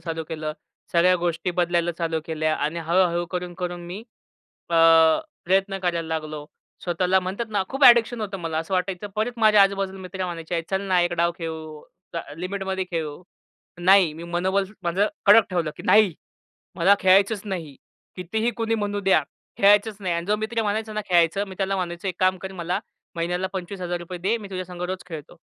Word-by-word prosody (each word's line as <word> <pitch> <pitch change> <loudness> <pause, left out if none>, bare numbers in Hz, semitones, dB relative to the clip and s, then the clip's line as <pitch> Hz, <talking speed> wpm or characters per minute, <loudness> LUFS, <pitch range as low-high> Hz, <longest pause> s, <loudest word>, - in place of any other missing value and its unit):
चालू 165 -1 -4
केलं, 155 -1 -4 0.4
सगळ्या 175 +2 +5
गोष्टी 170 +1 -2
बदलायला 175 -1 0
चालू 165 -1 -1
केल्या 155 -1 -1
आणि 155 +3 -2
हळू-हळू 170 +1 +2
करून, 180 0 -5
करून 175 -1 -4
मी 180 +4 -6 0.7
अ, - - 0 0.7
प्रयत्न 195 +2 +1
करायला 170 -3 -2
लागलो. 155 -2 -4 0.4
स्वतःला 180 +2 +2
म्हणतात 190 +6 -4
ना 205 -2 +1
खूप 270 +1 +1
एडिक्शन 240 -1 +6
होतं, 205 -2 -4
मला 165 -2 -3
असं 165 +4 -3
वाटायचं. 185 +1 -2
परत 220 +3 0
माझ्या 215 -2 +6
आजूबाजूला 195 -1 0
मित्र 185 0 -5
म्हणायचे, 170 -1 -3
"चल 190 0 0
ना 185 -2 +2
एक 175 0 +1
डाव 170 0 +1
खेळू, 160 -2 -6 0.3
ल - - -1 0.2
लिमिटमध्ये 190 0 -3
खेळू." 160 -1 -4 0.6
नाही, 185 -2 +5
मी 165 - -9
मनोबल 190 +3 +1 0.2
माझं 180 +4 +1 0.2
कडक 215 +2 +7
ठेवलं, 170 -4 -1
की - - -9
नाही 210 -5 +5 0.6
मला 190 +3 +5
खेळायचंच 195 +2 +4
नाही. 170 -8 -5 0.4
कितीही 220 +6 -1
कुणी 225 0 0
म्हणू 205 -1 -2
द्या, 190 -6 +3 0.3
खेळायचंच 205 +1 +4
नाही 185 -3 -1
आणि 170 0 -2
जो 210 +2 +2
मित्र 220 +2 -2
म्हणायचा 215 +1 -2
ना, 215 - -2
"खेळायचं," 175 +3 +3
मी 190 - -9
त्याला 195 0 0
म्हणायचो, 175 0 -4
"एक 185 - -2
काम 185 0 +3
कर, 190 - -6
मला 175 -1 -2 0.4
महिन्याला 175 +2 -1
₹25,000 180 -1 -5
दे, 195 +7 0
मी 205 -3 -10
तुझ्यासंग 185 -2 -6
रोज 185 +1 -4
खेळतो." 160 0 -9
185 Hz, 175 wpm, -24 LUFS, 170-195 Hz, 0.7 s, कडक